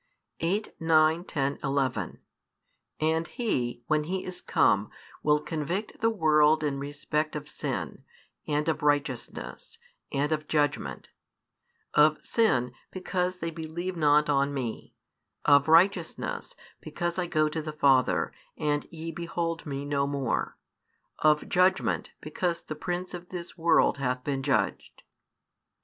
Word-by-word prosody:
8, 195 +6 -1
9, 160 +1 +4
10, 140 -5 -1
11 130 - -1 0.8
And 160 +1 +1
He, 125 - -2
when 155 +2 +1
He 185 +3 -3
is 185 -1 -5
come, - - +2 0.3
will 150 0 +3
convict 165 +7 -3
the 225 - +4
world 155 -6 +4
in 140 -2 -1
respect 145 +2 -2
of 150 -1 -5
sin, - - -4 0.4
and 150 +1 0
of 160 -1 0
righteousness, 145 -4 -2 0.3
and 145 +2 0
of 155 -1 -1
judgment: 145 - -1 0.8
of 150 +1 +5
sin, 125 - +2 0.2
because 185 -1 -2
they 165 -2 -4
believe 165 +3 -5
not 150 -2 +4
on 140 -1 +1
Me; 120 -5 -5 0.5
of 145 0 +6
righteousness, 170 +1 +2 0.2
because 175 +1 -3
I 175 - -1
go 155 -2 +2
to 160 +1 -3
the 155 0 -5
Father, 135 -4 +3 0.2
and 150 -1 0
ye 165 0 -6
behold 165 0 -3
Me 140 0 -4
no 140 -1 0
more; 140 -4 -2 0.6
of 150 0 +3
judgment, 185 +1 +2
because 170 +2 -2
the - - -5
prince 180 +4 -4
of 175 0 -8
this 175 -2 -7
world 165 -3 +3
hath 125 -1 -1
been 140 -2 -1
judged. 130 -8 -1
155 Hz, 130 wpm, -28 LUFS, 145-170 Hz, 0.8 s, of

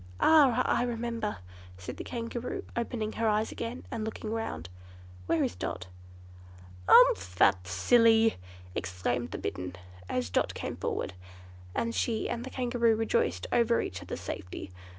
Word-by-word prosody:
"Ah, 270 -6 +6
I - - +2
remember!" 230 -2 -2 0.4
said 90 - -7
the - - -5
Kangaroo, 235 +1 -4
opening 230 -2 -2
her 225 0 -1
eyes 215 +1 +1
again 235 +2 -5
and 220 - -3
looking 220 0 -4
round. 155 - -3 0.6
"Where 165 - +2
is - - -1
Dot?" 90 0 -4 1.0
"Umph, 90 0 +6
that 90 0 +4
silly!" 225 - +4 0.4
exclaimed 100 +8 -2
the - - -5
Bittern, 90 0 -4 0.3
as 125 -7 -1
Dot - - +1
came - - -4
forward, - - -3 0.6
and 230 0 0
she 225 -2 0
and 235 - -3
the 260 - -6
Kangaroo 240 -3 +2
rejoiced 155 - 0
over 235 0 +3
each 90 - -4
other's - - -6
safety. 90 +1 -6
225 Hz, 145 wpm, -30 LUFS, -, 1.0 s, Ah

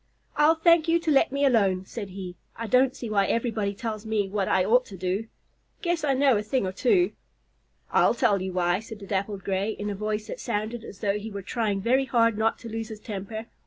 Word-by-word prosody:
"I'll 300 +2 +5
thank 335 0 +4
you 330 +1 +4
to 335 -2 -1
let 275 - +4
me 280 +1 +1
alone," 195 -7 +2
said 205 -1 -6
he. 185 -1 -7 0.2
"I 230 - -5
don't 255 +3 +3
see 240 - -6
why 200 -2 +2
everybody 220 -4 -1
tells 215 -1 -4
me 215 -3 0
what 195 -1 -1
I 185 -1 +2
ought 245 +5 +4
to 195 - -10
do. 185 +5 -2 0.6
Guess 345 -2 0
I 275 -3 +2
know 265 -3 +4
a - - 0
thing 215 +1 -1
or 185 - -2
two." 355 - +2 0.8
"I'll - - +4
tell 220 -5 +2
you 190 0 -3
why," 180 0 +1
said 220 0 -9
the 200 - -10
Dappled 195 0 -2
Gray, 195 +2 -1
in 205 0 -4
a - - -4
voice 210 +1 -2
that - - -7
sounded 215 +3 -3
as 195 - -11
though 205 0 0
he 215 +2 -6
were 200 -2 -6
trying 205 -2 -1
very 255 +5 +2
hard 230 -3 +3
not 220 +1 +1
to 235 - -8
lose 225 0 -4
his 215 -2 -8
temper. 215 +1 -6
215 Hz, 235 wpm, -26 LUFS, 200-245 Hz, 0.8 s, I'll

